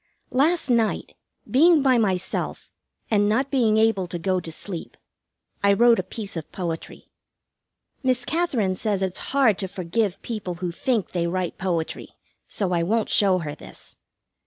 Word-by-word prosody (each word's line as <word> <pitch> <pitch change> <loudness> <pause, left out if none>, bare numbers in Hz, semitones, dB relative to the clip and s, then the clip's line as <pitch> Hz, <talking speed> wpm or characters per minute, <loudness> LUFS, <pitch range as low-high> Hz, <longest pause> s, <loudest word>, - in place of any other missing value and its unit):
Last 310 +6 +2
night, 235 -3 0 0.3
being 315 +3 +5
by 260 -3 +4
myself, 190 -5 -2 0.4
and 205 -1 +3
not 260 +6 +1
being 230 -6 +3
able 220 -4 +2
to 175 - -4
go 185 +2 0
to 165 -2 -8
sleep, 170 +1 -7 0.7
I 200 0 +5
wrote 235 +2 +5
a - - +2
piece 195 +2 -7
of 160 -2 -6
poetry. 170 -4 -6 0.9
Miss 255 -2 +1
Katherine 260 - 0
says 200 -1 -1
it's 185 -1 -2
hard 260 -8 +3
to 195 - -2
forgive 195 +2 -2
people 205 -6 -4
who 175 0 -3
think 230 +2 -1
they 170 -1 0
write 180 0 -3
poetry, 170 -4 -3 0.3
so 195 -3 -2
I 170 - +2
won't 215 +6 0
show 195 -3 +4
her 145 - -4
this. 145 - -12
200 Hz, 160 wpm, -24 LUFS, 180-240 Hz, 0.9 s, being